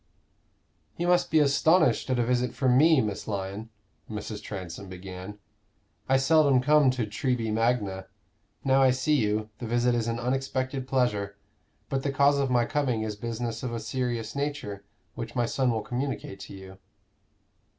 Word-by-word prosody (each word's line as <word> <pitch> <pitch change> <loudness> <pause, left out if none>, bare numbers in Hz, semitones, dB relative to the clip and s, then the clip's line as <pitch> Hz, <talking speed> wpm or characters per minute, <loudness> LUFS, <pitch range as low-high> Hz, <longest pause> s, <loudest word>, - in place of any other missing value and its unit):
"You 175 - -1
must 175 0 +3
be 160 - +3
astonished 150 -2 +3
at 130 - +1
a 120 - +1
visit 125 0 0
from 130 -2 +2
me, 155 +1 +6
Miss 105 -3 -4
Lyon," 100 +1 -4 0.4
Mrs. 105 -1 -5
Transome 95 -1 -7
began; 95 +2 -8 0.7
"I 135 - +5
seldom 140 -1 +4
come 145 +1 +4
to 130 -3 0
Treby 115 +1 -1
Magna. 105 -5 0 0.6
Now 135 0 +4
I 130 - +6
see 130 +4 +1
you, 110 -2 0
the 120 - -5
visit 120 +1 +2
is 115 -1 0
an 115 0 -1
unexpected 130 +1 -2
pleasure; 105 -7 0 0.5
but 135 - -1
the 140 - -1
cause 140 +1 +3
of 135 -1 +1
my 120 -1 +3
coming 125 -6 0
is 110 -1 -3
business 115 +1 -4
of 125 -2 -4
a 115 - -2
serious 115 0 -3
nature, 140 -9 -3 0.3
which 115 0 -7
my 120 -1 +2
son 130 +2 0
will 110 -2 -1
communicate 125 -6 -4
to 100 0 -9
you." 95 0 -12
120 Hz, 165 wpm, -27 LUFS, 110-135 Hz, 0.7 s, me